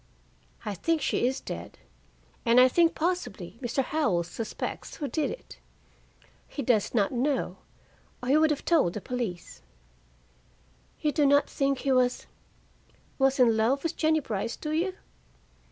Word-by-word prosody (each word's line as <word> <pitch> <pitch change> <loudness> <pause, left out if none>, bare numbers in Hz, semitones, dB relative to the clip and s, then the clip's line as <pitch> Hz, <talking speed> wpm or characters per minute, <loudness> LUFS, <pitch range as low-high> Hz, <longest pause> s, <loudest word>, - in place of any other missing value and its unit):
"I 210 - -2
think 325 - 0
she 260 -3 +1
is 265 +2 -1
dead, - - -7 0.7
and 235 0 +5
I 255 - +8
think 335 +5 +3
possibly 315 - -3
Mr. 260 +2 0
Howell 255 - +1
suspects 220 +6 -5
who 290 - -4
did 305 +1 -1
it. - - -9 0.9
He 280 - -5
does 230 -2 +1
not 200 -4 +2
know, 265 +2 -1 0.7
or 250 - -3
he 285 - +5
would 315 0 +4
have 300 -2 -2
told 305 - +3
the - - -4
police." 230 -8 -5 1.4
"You 300 - +2
do 290 -1 +3
not 285 +1 +4
think 275 -1 0
he 275 - 0
was 250 -1 +2 0.9
was 270 0 +3
in 235 -3 +5
love 235 +6 +1
with 330 0 -2
Jennie 315 0 +2
Brice, 225 -2 -3
do 305 - -5
you?" 360 +4 0
270 Hz, 155 wpm, -28 LUFS, 235-305 Hz, 1.4 s, I